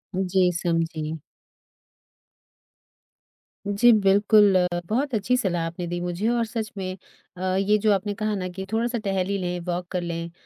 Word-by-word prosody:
जी 185 -1 +2
समझी। 165 -2 -2 2.5
जी 205 +4 +5
बिल्कुल। 205 0 +5 0.3
बहुत 265 +5 -1
अच्छी 230 +4 +1
सलाह 175 -7 -1
आपने 170 +1 -5
दी 175 +1 -3
मुझे 175 +4 -2
और 235 -1 +1
सच 220 -1 -4
में 185 -1 -4 0.4
अ, - - -8
ये 200 +2 +3
जो 210 0 +2
आपने 205 +1 -1
कहा 215 +1 -2
ना 185 -2 -3
कि 190 +2 -7
थोड़ा-सा 235 +2 0
टहल 195 -4 -1
ही 200 0 -1
लें, 180 -1 -3
वॉक 175 0 -3
कर 180 -2 -1
लें, 170 -1 -4
195 Hz, 155 wpm, -24 LUFS, 175-215 Hz, 2.5 s, जी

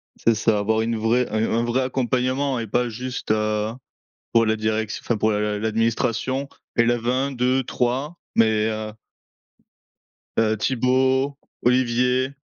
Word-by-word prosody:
C'est 115 -1 +2
ça. 110 -1 +2
Avoir 110 +2 +1
une 115 0 -1
vraie 115 +3 +1
un 110 +1 0
un 115 +1 +1
vrai 120 +2 +1
accompagnement 130 +1 0
et 115 - -4
pas 120 +4 +1
juste, 125 0 -4
heu, 105 0 0 0.6
pour 115 -1 +4
la 110 - +2
direction, 110 0 -2
enfin 120 - 0
pour 110 +1 +1
l'a 105 0 -1
l'administration, 115 +4 0 0.3
élève 120 0 +2
1-2-3 130 +2 0 0.2
mais, 110 -1 +3
heu 110 0 -4 1.5
heu, 110 -1 +2
Thibault, 130 +3 +1 0.3
Olivier, 125 +1 +2
115 Hz, 130 wpm, -23 LUFS, 110-130 Hz, 1.5 s, pour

